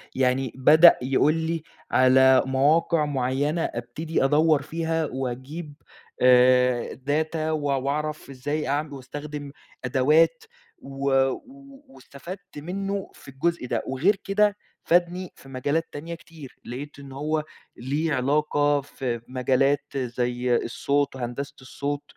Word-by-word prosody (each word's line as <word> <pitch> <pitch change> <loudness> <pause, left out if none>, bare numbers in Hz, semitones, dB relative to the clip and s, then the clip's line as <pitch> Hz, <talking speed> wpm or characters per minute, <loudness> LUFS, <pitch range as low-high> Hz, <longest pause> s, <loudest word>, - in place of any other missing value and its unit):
يعني 130 -1 +1
بدأ 155 +6 +7
يقول 135 +4 +2
لي 165 0 -2 0.3
على 130 0 +5
مواقع 150 +4 +2
معيّنة 145 +3 -1
ابتدي 155 +8 -3
أدوّر 150 +1 +3
فيها 160 +1 -2
وأجيب 135 +5 -5 0.5
آآ 125 -1 +4 0.2
data 155 +2 0
وأع 145 -3 0
وأعرف 150 +3 -3
إزاي 145 +3 -3
أعم 145 +2 -1
وأستخدم 145 +2 -7 0.3
أدوات، 155 - +3 0.4
و 135 0 -10 0.3
و 275 - -10
واستفدت 180 - -11
منّه 195 +5 -4
في - - -17
الجزء 135 +1 -2
ده. - - -1
وغيّر 155 +11 +2
كده 205 +1 +2 0.3
فادني 175 +1 +1
في 135 - -16
مجالات 145 +5 -1
تانية 165 +4 -6
كتير. 160 -5 -13
لقيت 140 +4 -7
إن 140 -1 -11
هو 150 +3 -2 0.3
ليه 150 +5 -1
علاقة 145 +2 +1
في 125 -4 -4
مجالات 135 +2 0
زي 125 0 -1
الصوت 140 +4 0
وهندسة 135 +3 -5
الصوت. 145 +2 -4
145 Hz, 120 wpm, -25 LUFS, 130-160 Hz, 0.5 s, بدأ